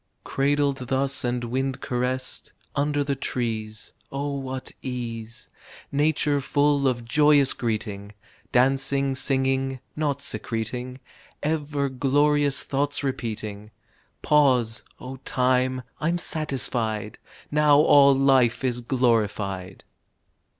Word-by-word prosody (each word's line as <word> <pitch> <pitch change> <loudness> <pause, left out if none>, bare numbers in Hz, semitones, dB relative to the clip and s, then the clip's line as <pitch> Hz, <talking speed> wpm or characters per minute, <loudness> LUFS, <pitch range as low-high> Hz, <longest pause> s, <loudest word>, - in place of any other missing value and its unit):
"Cradled 140 -2 0
thus 135 +1 0
and 120 0 -1
wind 130 +2 -2
caressed," 130 0 -3 0.2
Under 145 0 +1
the 140 0 -1
trees, 110 -5 -4 0.2
(Oh 140 +1 -3
what 130 -1 -5
ease.) 120 -2 -6 0.4
Nature 145 0 +1
full 145 0 +2
of 120 -2 -1
joyous 145 +1 +4
greeting; 105 -3 -4 0.4
Dancing, 135 +2 +2
singing, 135 0 0 0.2
naught 145 -2 -1
secreting, 125 0 -2 0.4
Ever 145 -2 -1
glorious 145 +2 +2
thoughts 145 +1 -1
repeating 110 -5 -4 0.5
Pause, 125 -7 +3 0.2
O 130 +1 -8
Time, 130 0 0 0.2
I'm 165 +3 0
satisfied! 120 - -2 0.3
Now 150 -1 +5
all 140 -2 +6
life 135 -3 +3
Is 120 -2 -1
glorified! 105 -7 -1
130 Hz, 100 wpm, -25 LUFS, 120-140 Hz, 0.5 s, all